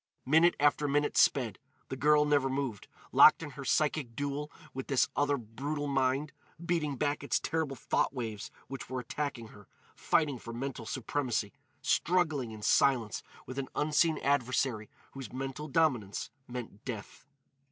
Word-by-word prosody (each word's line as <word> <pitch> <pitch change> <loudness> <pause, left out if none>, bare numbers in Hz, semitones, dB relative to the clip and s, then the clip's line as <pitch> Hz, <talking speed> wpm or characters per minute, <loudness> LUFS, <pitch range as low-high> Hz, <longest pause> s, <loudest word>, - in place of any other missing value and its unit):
Minute 160 +6 +5
after 145 0 +3
minute 145 +1 +1
sped: 120 -7 +3 0.3
the - - -3
girl 150 +2 +4
never 145 -2 +2
moved, 130 -6 -3 0.2
locked 155 - +7
in 150 - -6
her 140 +1 -8
psychic 140 -3 0
duel 145 +2 -3 0.2
with 130 0 -5
this 135 -3 +3
other 145 0 +2
brutal 140 +6 -4
mind,—beating 145 +3 -1
back 145 +1 -1
its 140 - +1
terrible 160 -4 -2
thought - - 0
waves 115 -6 -5 0.2
which 135 0 -7
were 130 0 -2
attacking 125 -2 -4
her, 105 -2 -15 0.3
fighting 145 -6 +1
for 115 - -8
mental 125 -2 -5
supremacy, 120 -4 -2 0.3
struggling 160 -8 +1
in 110 -1 -9
silence 120 -7 +3 0.2
with 130 +2 -5
an 135 - -3
unseen 155 +2 +2
adversary 130 -5 +1 0.2
whose 135 -1 -8
mental 135 +3 -5
dominance 130 -10 0 0.2
meant 120 -4 -7
death. 120 +2 -7
135 Hz, 145 wpm, -31 LUFS, 125-150 Hz, 0.3 s, locked